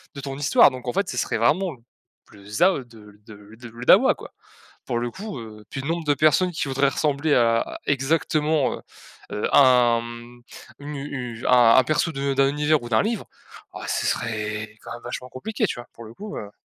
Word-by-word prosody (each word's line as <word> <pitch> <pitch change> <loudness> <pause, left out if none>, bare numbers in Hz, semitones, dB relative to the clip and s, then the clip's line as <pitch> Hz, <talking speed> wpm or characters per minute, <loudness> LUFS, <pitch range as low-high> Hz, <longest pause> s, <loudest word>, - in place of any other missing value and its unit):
de 140 - -6
ton 135 -1 -6
histoire, 145 0 +5
donc 130 -1 -9
en 120 - -1
fait, 200 -1 -1
ce 125 - -5
serait - - -1
vraiment 160 - +1 0.5
plus 100 -1 -17
de - - -13
ça, 175 - +4
heu, 135 -7 -5
de 115 -2 -17
le 105 -1 -16
de 110 - -12
le 105 +1 -15 0.2
le 120 +2 -9
dawa - - +6
quoi! - - -12 0.5
Pour 120 - -1
le 120 0 -2
coup, 200 - -7
heu 105 -2 -11
puis 135 - -5
le 140 - -5
nombre 165 0 -2
de 145 - +4
personnes 155 +5 +3
qui 160 -3 -3
voudraient 135 +1 +2
ressembler 145 +1 0
à 115 -1 +1
exactement, 150 +1 +1
heu - - -7 0.5
heu, 105 - -1
à - - +6
un, 125 -3 +4
hem 120 +1 -11 0.4
une 145 +1 -7
u 125 -4 -6
à 120 -2 +6
un 130 - +5
perso 155 +2 0
de 140 -1 -2
d'un 135 0 +3
univers 150 +1 +1
ou 120 - -7
d'un 110 - +4
livre, 220 -1 -2 0.5
oh - - -7
ce - - -1
serait 110 -1 -3
quand - - -8
même 120 - -9
vachement 125 +1 -7
compliqué, 215 - -3
tu - - -4
vois? 120 - -9
Pour 115 - -11
le 110 - -11
coup, 210 - -8
heu 100 - -8
130 Hz, 225 wpm, -23 LUFS, 115-150 Hz, 0.5 s, dawa